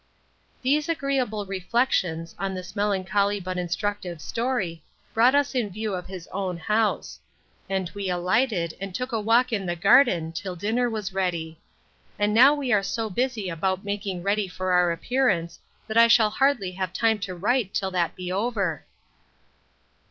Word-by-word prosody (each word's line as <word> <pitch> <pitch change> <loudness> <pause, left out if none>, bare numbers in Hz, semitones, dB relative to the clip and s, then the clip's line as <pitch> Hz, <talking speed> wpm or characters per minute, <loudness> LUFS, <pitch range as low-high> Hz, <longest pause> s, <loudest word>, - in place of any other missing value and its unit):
These 295 +5 +1
agreeable 265 -9 -1
reflections, 185 -4 0
on 195 -1 -2
this 185 +2 -8
melancholy 200 0 +1
but 185 -1 -4
instructive 180 -1 -3
story, 215 -7 -2 0.3
brought 245 +4 +5
us 285 -1 +2
in 240 -5 0
view 215 +2 -4
of 180 -1 -4
his 185 -3 -8
own 185 -2 -3
house; 210 +6 0 0.5
and 190 -2 -1
we 200 -2 -3
alighted, 180 0 +1
and 195 -2 -5
took 250 +1 -3
a 225 -2 -1
walk 230 +3 +3
in 195 -4 -1
the 175 - -1
garden 175 - +4
till 180 +2 -5
dinner 225 +7 0
was 215 -4 -4
ready. 170 -4 -2 0.6
And 205 0 +1
now 265 +6 +7
we 270 -5 -1
are 205 - +4
so 220 +2 -3
busy 240 -1 -1
about 185 +3 -2
making 200 -3 -3
ready 200 +1 +1
for 185 0 -3
our 180 -1 +4
appearance, 170 -3 0 0.3
that 220 +1 -3
I 230 - +8
shall 225 -2 +5
hardly 265 -6 +1
have 185 -1 -4
time 225 -2 +2
to 190 -2 -5
write 210 +3 0
till 190 -1 -1
that 175 -2 0
be 180 0 -5
over. 200 -5 -1
200 Hz, 165 wpm, -25 LUFS, 180-230 Hz, 0.6 s, I